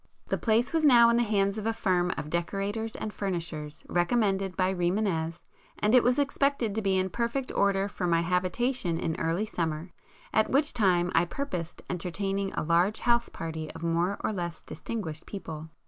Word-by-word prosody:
The - - +1
place 230 +4 +2
was 325 -1 +2
now 240 -5 +7
in - - +2
the - - +3
hands 205 -2 +1
of 215 - -3
a 225 - +1
firm 185 -5 +1
of - - -2
[p - - -3
168] 150 - -10
decorators 205 +4 -3
and 215 - -4
furnishers, 165 -6 -4
recommended 195 0 +1
by 185 0 +2
Rimânez, 175 -3 -1 0.3
and 210 +2 +1
it 250 - +8
was 245 +2 +3
expected 280 -5 +1
to 220 - -1
be 195 -2 +2
in 185 0 0
perfect 240 +4 -2
order 200 0 +2
for 185 -3 -3
my 165 -1 +3
habitation 180 +2 0
in 165 -2 -1
early 165 +6 0
summer, 165 -4 -3 0.4
at 220 - +3
which 285 +3 +2
time 180 -6 +2
I 165 - +4
purposed 175 - -5
entertaining 195 +2 -2
a - - -2
large 170 +6 +2
house 235 -1 +2
party 160 -1 -5
of 165 +1 -9
more 170 +4 +1
or - - -1
less 175 -3 -4
distinguished 170 -9 -6
people. 160 -5 -7
195 Hz, 190 wpm, -28 LUFS, 170-225 Hz, 0.4 s, it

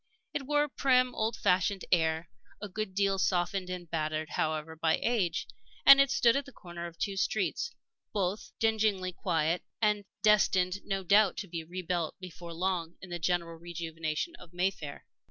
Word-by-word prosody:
It 275 - -3
wore 295 0 +3
a - - -1
prim, 255 -2 +3
old 220 +1 -1
fashioned 185 +1 +1
air, 160 -1 +2 0.3
a 210 - -5
good 195 -1 -4
deal 195 -1 +2
softened 180 0 0
and 180 -1 -5
battered, 155 -1 -2
however, 155 0 -1
by 160 0 +2
age, 195 - 0 0.4
and 275 0 +10
it 275 - +3
stood 240 -3 +4
at 275 0 0
the 275 - -12
corner 175 -6 -8
of 170 -1 -12
two 200 +2 -2
streets, 470 - 0 0.4
both 200 0 -2
dingily 215 -4 +1
quiet, 165 -1 0 0.2
and 210 -2 +2 0.2
destined, 195 -3 +4
no 195 -1 -2
doubt, 200 +1 +4
to 200 - -4
be 165 -2 -5
rebuilt 175 -1 -3
before 175 -2 -9
long 175 -1 -1
in 185 - -11
the 175 - -3
general 170 0 -1
rejuvenation 165 - -4
of 175 -1 -15
Mayfair. 175 -5 -2
185 Hz, 170 wpm, -30 LUFS, 170-210 Hz, 0.4 s, and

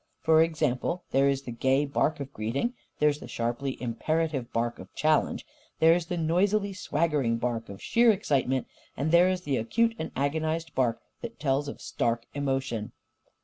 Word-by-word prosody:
For 160 0 +5
example, 160 +1 0
there 135 +1 +4
is 135 0 -1
the 125 - -6
gay 130 +4 +2
bark 145 +2 0
of 140 -1 -6
greeting, 125 - -1 0.2
there 150 - +4
is 145 0 -2
the - - -9
sharply 120 +3 -3
imperative 135 +2 -1
bark 120 +1 -1
of - - -11
challenge, 155 0 +1 0.3
there 165 +1 +6
is 170 -1 -1
the 175 - -2
noisily 195 +5 +1
swaggering 150 -9 0
bark 115 -1 -2
of 100 -1 -9
sheer 235 0 +5
excitement, 135 - 0 0.3
and 145 +4 0
there 175 +2 +6
is 185 -1 -1
the 140 -6 -1
acute 230 - +1
and 160 - -4
agonised 160 +4 -1
bark 120 -3 0 0.2
that 235 -1 -7
tells 140 0 0
of 140 - -7
stark 115 0 -1
emotion. 135 -6 -2
145 Hz, 175 wpm, -28 LUFS, 125-165 Hz, 0.3 s, there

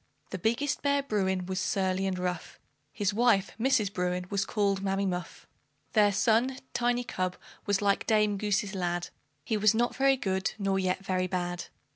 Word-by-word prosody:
The 185 - -4
biggest 250 +8 0
bear, 280 0 +2
Bruin, 190 -7 0
was 185 0 -2
surly 190 0 0
and 185 -1 -2
rough; 180 -1 -4 0.3
His 200 +6 -1
wife, 215 -3 +3
Mrs. 220 -5 +2
Bruin, 180 0 -1
was 200 -1 0
called 200 -2 0
Mammy 195 0 0
Muff. 180 -2 -4 0.5
Their 210 -2 +5
son, 230 +6 +2 0.2
Tiny 245 0 +1
cub, 185 -5 -3 0.3
was 205 0 +1
like 200 -1 +1
Dame 210 -2 +3
Goose's 205 -1 0
lad; 175 -2 -2 0.4
He 220 - 0
was 215 +1 +4
not 240 +2 +1
very 270 0 +3
good, 190 -4 -1
nor 195 -2 0
yet 185 +1 -1
very 185 -1 0
bad. 175 -1 -3
195 Hz, 170 wpm, -29 LUFS, 185-220 Hz, 0.5 s, Their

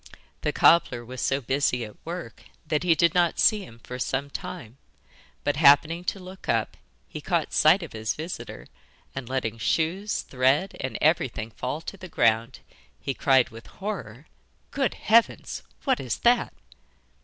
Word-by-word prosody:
The - - 0
cobbler 125 -8 +4
was 130 +1 -7
so 135 +1 +1
busy 130 -1 0
at 105 - -14
work 170 -8 -7 0.2
that 150 - 0
he 175 -2 +3
did 170 +2 +3
not 175 -2 +2
see 215 -3 +4
him 115 -10 -13
for 125 0 -7
some 135 +2 -2
time, 120 -1 -7 0.6
but, 145 -1 0
happening 155 +3 +5
to 195 - -2
look 185 +1 -11
up, - - 0 0.3
he - - -8
caught - - -1
sight 170 +5 +5
of 165 - -9
his 110 -1 -2
visitor, 165 +3 -7 0.5
and 130 -2 -6
letting 115 -4 -2
shoes, 175 - 0
thread, 135 +8 +1
and 130 - -3
everything 130 -8 +1
fall 130 +7 -4
to 195 - -8
the 185 -1 -10
ground, 115 -2 +1 0.4
he 135 - -3
cried 130 -2 +3
with 115 0 -12
horror: 155 - -6 0.5
'Good 270 -6 0
heavens! 230 +2 +2 0.2
what 265 -3 +1
is 125 -4 -3
that? 240 +1 +3
145 Hz, 160 wpm, -26 LUFS, 125-180 Hz, 0.6 s, happening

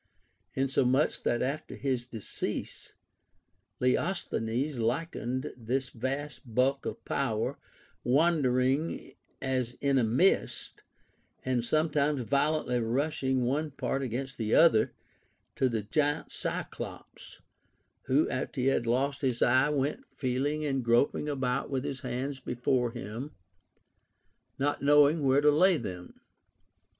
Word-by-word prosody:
Inso 135 0 +2
much 130 +4 +2
that 120 - 0
after 145 +4 -3
his 130 -3 -2
decease 115 -5 -5 0.8
Leosthenes 130 - 0
likened 125 +1 -2
this 125 +2 -2
vast 130 0 -5
bulk 135 +2 +2
of - - -6
power 115 -5 -1 0.3
— - - -35
wandering 135 0 +1 0.3
as 130 -3 -1
in 140 0 +1
a - - +2
mist, 125 - +1 0.6
and 125 -2 +1
sometimes 150 0 +1
violently 140 -1 +1
rushing 130 +2 0
one 145 +5 0
part 135 -1 -2
against 130 +1 -4
the 110 -1 +1
other 160 -10 +5 0.3
— - - -43
to 130 - +3
the 110 -3 -2
giant 145 +7 0
Cyclops, - - -6 0.7
who - - +3
after - - -3
he 125 - +1
had 120 -3 0
lost 135 +4 0
his 130 -4 +1
eye 130 +4 +4
went 150 - -1
feeling 140 +4 -2
and 135 -3 -1
groping 120 +5 +2
about 135 -2 -1
Avith 135 -2 -1
his 135 -2 -4
hands 135 +3 -4
before 125 0 0
him, 115 +4 -7 1.2
not 145 +2 0
knowing 145 +2 +5
where 135 0 +4
to 150 0 +5
lay 180 +4 +4
them. 90 -8 -7
130 Hz, 125 wpm, -29 LUFS, 125-145 Hz, 1.2 s, other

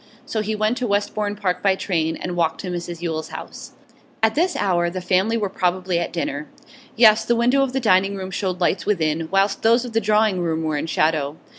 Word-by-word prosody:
So 220 - -2
he 215 +1 -2
went 215 +4 0
to 250 - -1
Westbourne 205 0 -1
Park 185 -3 -2
by 195 -1 +3
train, 165 -4 -1
and 180 - -5
walked 165 -2 0
to 185 - -5
Mrs 175 -1 -5
Yule's 160 -2 -3
house. - - -9 0.5
At 220 0 +4
this 350 +4 +1
hour 175 -3 +1
the 185 +2 -5
family 190 +5 +1
were 210 -2 -1
probably 185 -1 -1
at 170 - -3
dinner; 150 -3 -4 0.5
yes, 220 -1 +6
the 235 +2 +1
window 245 +4 +3
of 270 -2 0
the 265 - -1
dining 195 -4 +3
room 190 -1 -6
showed 185 -1 -2
lights 180 +2 0
within, 160 -5 0
whilst 195 +1 +1
those 235 +2 +3
of 240 - -8
the 225 - +2
drawing 210 -2 +2
room 160 -1 -1
were 155 -1 -1
in 150 - -2
shadow. 155 -2 0
190 Hz, 220 wpm, -21 LUFS, 170-215 Hz, 0.5 s, yes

